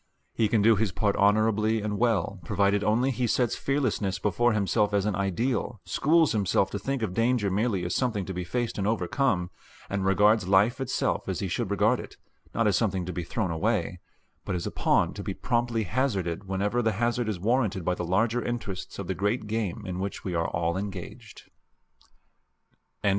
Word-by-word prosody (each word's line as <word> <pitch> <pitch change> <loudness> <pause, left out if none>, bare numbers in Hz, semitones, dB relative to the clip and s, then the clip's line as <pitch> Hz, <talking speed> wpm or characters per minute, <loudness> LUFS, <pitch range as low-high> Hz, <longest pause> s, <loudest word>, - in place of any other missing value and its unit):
He 110 - +2
can 105 -1 +2
do 115 +1 +6
his 105 -1 0
part 100 +3 0
honorably 110 +2 +3
and 105 -1 -3
well 100 -5 +1
provided 100 +3 +1
only 120 +6 +2
he 125 -1 -1
sets 120 +1 +1
fearlessness 130 -8 -1
before 110 +4 +1
himself 105 0 +1
as 100 -1 +1
an 105 - 0
ideal, 105 +5 -1
schools 160 +1 +3
himself 100 -2 +1
to 100 - -3
think 135 +3 -2
of 95 -5 -2
danger 115 -1 +1
merely 100 -2 0
as 90 - -2
something 115 -7 0
to 95 - -5
be 90 0 -3
faced 115 +5 -2
and 100 - 0
overcome, 100 -2 0 0.4
and 100 -1 -1
regards 100 +1 +3
life 105 +7 +3
itself 130 -1 -1
as - - -2
he 95 - -2
should 105 +4 -2
regard 105 +5 +2
it, - - -10 0.3
not - - 0
as - - +3
something 95 -2 0
to 90 - -5
be 90 - -3
thrown 95 +1 -2
away, 80 -1 -1 0.4
but - - -3
as 85 - -3
a - - -3
pawn - - +2
to - - -6
be - - -4
promptly 120 -1 0
hazarded 100 -5 -1
whenever 100 +5 0
the 110 -2 +1
hazard 120 +2 0
is 100 -5 -3
warranted 105 -4 0
by 90 - +2
the 90 - -4
larger 110 +7 +1
interests 110 -6 -5
of 100 - -4
the 95 - -2
great 105 +5 -1
game 105 -2 -3
in 90 -1 -4
which 100 +1 -4
we 90 - -3
are 85 -1 0
all 85 +1 -1
engaged. 95 -2 -8
105 Hz, 195 wpm, -27 LUFS, 95-115 Hz, 0.4 s, do